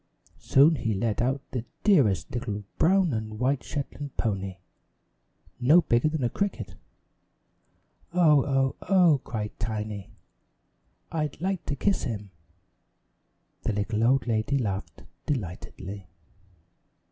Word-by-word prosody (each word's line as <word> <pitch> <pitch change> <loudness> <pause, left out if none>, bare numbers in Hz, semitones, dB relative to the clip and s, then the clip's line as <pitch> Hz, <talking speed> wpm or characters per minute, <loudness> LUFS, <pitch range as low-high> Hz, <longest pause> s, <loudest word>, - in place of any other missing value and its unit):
Soon 145 +4 +5
he 110 -4 -1
led 105 +3 0
out 130 +3 0
the 125 -3 -3 0.2
dearest 110 - +3
little 105 -4 -3 0.2
brown 185 -3 +4
and 110 -1 -4
white 130 +3 +1
Shetland 145 0 -6
pony 100 -4 -2 1.0
no 150 +8 +6
bigger 120 +6 +2
than 155 -3 -2
a - - +3
cricket. 120 - -2 1.4
"Oh, 155 -6 +5
oh, 135 -1 +1
oh!" 175 -8 +5
cried 105 -2 -4
Tiny. 105 -2 -4 1.0
"I'd 150 -3 -2
like 190 +1 -2
to 145 - -1
kiss 200 +8 +1
him!" 105 -4 -5 1.3
The - - -1
little 105 +2 -1
old 130 +3 +3
lady 115 +4 0
laughed 100 -6 -3 0.2
delightedly. 95 - -5
125 Hz, 115 wpm, -27 LUFS, 105-150 Hz, 1.4 s, no